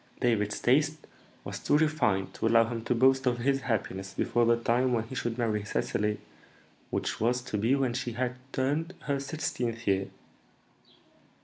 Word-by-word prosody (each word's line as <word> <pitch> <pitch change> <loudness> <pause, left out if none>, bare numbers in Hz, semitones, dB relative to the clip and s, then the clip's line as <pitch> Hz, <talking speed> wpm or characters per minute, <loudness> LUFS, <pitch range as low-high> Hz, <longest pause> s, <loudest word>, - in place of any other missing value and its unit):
David's 105 -4 +1
taste 150 +5 +2 0.4
was - - -6
too 145 - +3
refined 150 -12 +1
to - - -1
allow 115 0 +5
him 115 -1 -4
to 125 - +1
boast 130 +2 +4
of 120 -1 +2
his 135 +3 +1
happiness 95 -5 -3
before 120 -1 +2
the 115 0 +4
time 125 +2 +1
when 115 -2 +1
he 115 - -10
should 120 -2 -2
marry 110 -4 0
Cecily, 105 0 -1 0.7
which - - -2
was 125 +2 +1
to 110 - -5
be 115 +6 +3
when 135 -3 0
she 120 -1 -3
had 125 +1 -1 0.2
turned 150 +7 -1
her 140 -1 -1
sixteenth 125 -5 -3
year. 95 -1 +1
120 Hz, 170 wpm, -29 LUFS, 115-135 Hz, 0.7 s, allow